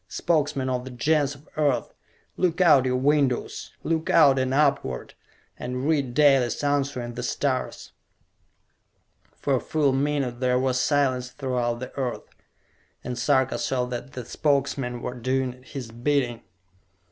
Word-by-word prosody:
Spokesmen 150 Hz, -, 0 dB
of 125 Hz, -1 st, -1 dB
the 130 Hz, -, -8 dB
Gens 145 Hz, +3 st, +1 dB
of 140 Hz, +2 st, -19 dB
Earth, 145 Hz, -4 st, +1 dB, 0.4 s
look 180 Hz, -1 st, 0 dB
out 150 Hz, -8 st, +6 dB
your 125 Hz, 0 st, +1 dB
windows! 135 Hz, -1 st, 0 dB
Look 160 Hz, 0 st, -1 dB
out 140 Hz, -5 st, +6 dB
and 130 Hz, 0 st, 0 dB
upward 140 Hz, -, 0 dB, 0.5 s
and 125 Hz, +2 st, -3 dB
read 140 Hz, -6 st, 0 dB
Dalis' 135 Hz, -3 st, +3 dB
answer 140 Hz, -2 st, 0 dB
in 120 Hz, 0 st, -6 dB
the 120 Hz, -, -5 dB
stars!" 130 Hz, +1 st, -2 dB, 1.4 s
For 140 Hz, -2 st, 0 dB
a -, -, -1 dB
full 145 Hz, -1 st, +1 dB
minute 135 Hz, -3 st, -1 dB
there 125 Hz, -1 st, +2 dB
was 130 Hz, 0 st, +1 dB
silence 130 Hz, -3 st, +1 dB
throughout 125 Hz, -3 st, -2 dB
the 130 Hz, -, -7 dB
earth, 130 Hz, -3 st, -3 dB, 0.8 s
and 125 Hz, -, -4 dB
Sarka 130 Hz, +1 st, +1 dB
saw 125 Hz, -2 st, 0 dB
that 125 Hz, +2 st, -6 dB
the 125 Hz, -2 st, -6 dB
Spokesmen 135 Hz, -3 st, -1 dB
were -, -, -3 dB
doing 130 Hz, +1 st, -2 dB
his 130 Hz, -3 st, -8 dB
bidding. 120 Hz, 0 st, 0 dB
130 Hz, 145 wpm, -25 LUFS, 125-145 Hz, 1.4 s, out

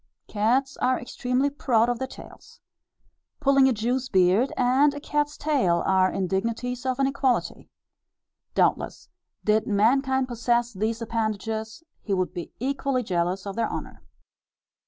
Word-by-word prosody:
Cats 245 Hz, +6 st, 0 dB
are 255 Hz, 0 st, +1 dB
extremely 250 Hz, +3 st, -1 dB
proud 240 Hz, -5 st, +2 dB
of 240 Hz, -1 st, -1 dB
their 265 Hz, -, -2 dB
tails. -, -, -14 dB, 0.8 s
Pulling 275 Hz, -2 st, +4 dB
a -, -, +3 dB
Jew's 245 Hz, +3 st, -1 dB
beard, 190 Hz, +7 st, +3 dB
and 265 Hz, +4 st, +3 dB
a -, -, -5 dB
cat's 295 Hz, 0 st, -1 dB
tail, 255 Hz, -, +1 dB
are 190 Hz, -1 st, +3 dB
indignities 230 Hz, +7 st, -2 dB
of 255 Hz, -1 st, 0 dB
an 275 Hz, -, +2 dB
equality. 270 Hz, -2 st, -1 dB, 0.9 s
Doubtless, -, -, 0 dB, 0.3 s
did 215 Hz, 0 st, +2 dB
mankind 265 Hz, +5 st, +2 dB
possess 240 Hz, 0 st, 0 dB
these 220 Hz, +4 st, -2 dB
appendages, 220 Hz, +2 st, -3 dB, 0.2 s
he 200 Hz, -, -1 dB
would 185 Hz, -1 st, -1 dB
be 175 Hz, -2 st, -6 dB
equally 270 Hz, 0 st, -1 dB
jealous 180 Hz, -1 st, -1 dB
of 200 Hz, -1 st, -5 dB
their 230 Hz, -, 0 dB
honour. -, -, -7 dB
240 Hz, 135 wpm, -25 LUFS, 210-265 Hz, 0.9 s, Pulling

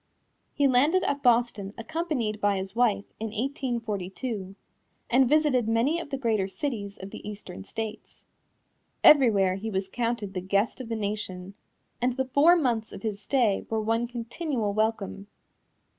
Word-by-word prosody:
He 285 Hz, -, +2 dB
landed 290 Hz, +9 st, +3 dB
at 285 Hz, 0 st, -1 dB
Boston 235 Hz, -5 st, +2 dB
accompanied 250 Hz, -6 st, -2 dB
by 205 Hz, -1 st, +2 dB
his 190 Hz, +2 st, -5 dB
wife, 215 Hz, -5 st, +2 dB
in 225 Hz, -, -2 dB
1842, 220 Hz, -4 st, -3 dB, 0.6 s
and 255 Hz, 0 st, +5 dB
visited 290 Hz, -6 st, +3 dB
many 235 Hz, +9 st, +2 dB
of 335 Hz, -, -7 dB
the 275 Hz, -, -2 dB
greater 220 Hz, -7 st, 0 dB
cities 200 Hz, -1 st, -4 dB
of 190 Hz, +1 st, -9 dB
the -, -, -7 dB
Eastern 205 Hz, -, -8 dB
states. 220 Hz, -, -7 dB, 0.8 s
Everywhere 205 Hz, -10 st, +6 dB
he 220 Hz, +3 st, -4 dB
was 190 Hz, -2 st, -2 dB
counted 230 Hz, -2 st, -2 dB
the 185 Hz, -, -3 dB
guest 200 Hz, +7 st, 0 dB
of 240 Hz, -, -8 dB
the 225 Hz, -, -1 dB
nation, 200 Hz, -3 st, -4 dB, 0.5 s
and 250 Hz, +1 st, +2 dB
the 265 Hz, -, +1 dB
four 285 Hz, +7 st, +5 dB
months 240 Hz, -9 st, 0 dB
of 195 Hz, -, -9 dB
his 210 Hz, -2 st, -3 dB
stay 235 Hz, -7 st, +1 dB
were 225 Hz, -, 0 dB
one 225 Hz, +2 st, 0 dB
continual 240 Hz, -1 st, -3 dB
welcome. 215 Hz, -2 st, -1 dB
225 Hz, 155 wpm, -27 LUFS, 200-255 Hz, 0.8 s, Everywhere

